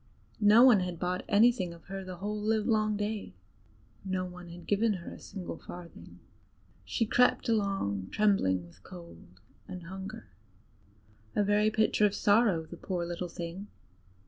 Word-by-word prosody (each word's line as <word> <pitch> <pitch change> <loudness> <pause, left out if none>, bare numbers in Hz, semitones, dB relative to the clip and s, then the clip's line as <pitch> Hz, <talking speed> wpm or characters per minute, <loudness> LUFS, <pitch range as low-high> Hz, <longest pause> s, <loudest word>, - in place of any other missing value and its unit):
Nobody 215 0 +7
had 180 -2 -5
bought 180 +2 -2
anything 205 -5 +3
of 170 - -17
her 195 0 -6
the 185 -1 -7
whole 205 +4 -4
livelong 215 0 +1
day; 205 - -4 0.7
no 185 -1 -2
one 180 -1 -10
had 170 +1 -11
given 210 +2 +2
her 175 -3 -7
a - - -11
single 180 -4 -7
farthing. 175 -1 -11 0.7
She 230 - -1
crept 250 +3 +3
along 195 - 0
trembling 145 - +2
with 85 +2 -19
cold 170 - -12 0.4
and 185 -2 -8
hunger 190 +5 -8 1.1
a 210 - +3
very 205 +1 +3
picture 215 -1 +3
of 205 - -4
sorrow, 205 -6 +3
the 175 - -10
poor 180 -2 -3
little 175 +1 -4
thing! 170 +4 -6
195 Hz, 145 wpm, -30 LUFS, 175-210 Hz, 1.1 s, Nobody